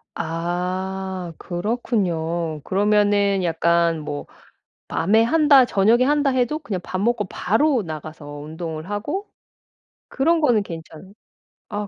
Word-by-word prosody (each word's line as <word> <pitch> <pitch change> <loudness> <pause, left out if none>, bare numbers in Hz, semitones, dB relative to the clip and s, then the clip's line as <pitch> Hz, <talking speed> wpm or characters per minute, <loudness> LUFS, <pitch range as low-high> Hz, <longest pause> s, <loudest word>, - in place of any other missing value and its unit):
아. 180 +2 -3
그렇군요. 175 - -2
그러면은 205 0 +2
약간 170 0 +2
뭐 145 -1 -5 0.6
밤에 220 +6 +3
한다 285 0 +5
저녁에 225 +3 +3
한다 290 0 +2
해도 260 +4 0
그냥 220 -12 -4
밥 185 - -4
먹고 230 -1 +1
바로 235 +7 +1
나가서 155 -1 -8
운동을 160 +2 -6
하고 290 - -3 0.8
그런 325 +5 +2
거는 240 -9 +3
괜찮은 165 +1 -10 0.6
아 205 0 -3
190 Hz, 235 characters per minute, -22 LUFS, 170-235 Hz, 0.8 s, 한다